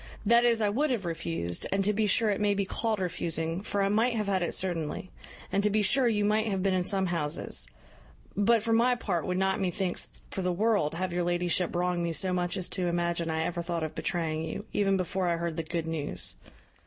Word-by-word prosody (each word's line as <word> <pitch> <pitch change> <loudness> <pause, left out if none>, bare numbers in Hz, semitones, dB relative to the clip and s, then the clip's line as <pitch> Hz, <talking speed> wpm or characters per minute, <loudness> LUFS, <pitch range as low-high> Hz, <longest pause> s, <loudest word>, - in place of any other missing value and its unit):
that 235 +3 +5
is, 230 -2 +3
I 205 - +3
would 285 +9 +1
have 230 -7 -1
refused, 165 - -2
and 195 0 +1
to 210 - +2
be 215 +1 +1
sure 215 +2 +3
it 200 - -1
may 205 -1 +2
be 200 0 0
called 220 +2 -1
refusing, 165 -1 -2
for 205 -1 -1
I - - +2
might 225 +4 +2
have 215 -2 0
had 195 -2 +1
it 175 - 0
certainly; 175 -1 -2 0.4
and 200 - +2
to 210 - +2
be 210 +1 +2
sure 245 +5 +4
you 210 -3 +2
might 215 +1 +2
have 195 -3 -1
been 195 -1 +2
in 185 -1 +1
some 195 0 +2
houses; 160 - 0 0.7
but, 220 +2 +3
for 225 0 +1
my 240 +2 +4
part, 180 -9 -2
would 180 0 0
not 190 +1 +1
methinks 185 -1 -1 0.2
for 190 - -3
the 180 0 0
world 200 -5 +1
have 185 +1 -2
your 175 - 0
ladyship 175 0 0
wrong 175 0 0
me 170 -1 -1
so 185 +4 +2
much 180 +1 -1
as 185 - -1
to 180 -2 0
imagine 170 -1 0
I 160 0 0
ever 170 +1 -2
thought 170 -1 -2
of 155 - -3
betraying 160 -3 -1
you, 160 +6 -5
even 195 -1 +2
before 185 0 -1
I 170 -1 +1
heard 170 -1 -3
the 165 - -1
good 165 0 -3
news." 160 -3 -2
185 Hz, 235 wpm, -29 LUFS, 170-205 Hz, 0.7 s, that